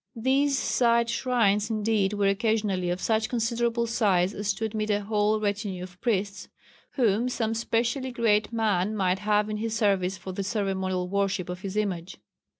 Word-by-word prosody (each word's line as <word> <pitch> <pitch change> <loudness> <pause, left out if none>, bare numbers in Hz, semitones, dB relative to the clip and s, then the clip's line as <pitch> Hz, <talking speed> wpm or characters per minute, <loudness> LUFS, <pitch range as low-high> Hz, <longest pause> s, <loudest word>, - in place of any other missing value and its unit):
These 270 +4 +2
side 235 -2 +2
shrines 230 -5 +1
indeed 215 -2 +1
were 205 -1 +1
occasionally 200 -3 0
of 175 +1 -1
such 220 +2 0
considerable 235 0 0
size 200 -5 +1
as 205 0 -1
to 220 +3 -3
admit 215 0 -3
a 205 0 +1
whole 210 +1 +1
retinue 205 -3 -2
of 180 0 -12
priests 200 -4 -1 0.5
whom 235 -1 +2
some 225 -3 -1
specially 235 +3 -1
great 220 -3 +1
man 215 -3 0
might 190 -2 +1
have 210 +1 +1
in 215 0 -3
his 225 +1 -2
service 195 -4 +1
for 180 +2 -7
the 195 +2 -3
ceremonial 190 -3 -1
worship 195 -2 -1
of 180 0 -5
his 195 +1 -5
image. 185 -4 -2
210 Hz, 165 wpm, -26 LUFS, 195-230 Hz, 0.5 s, These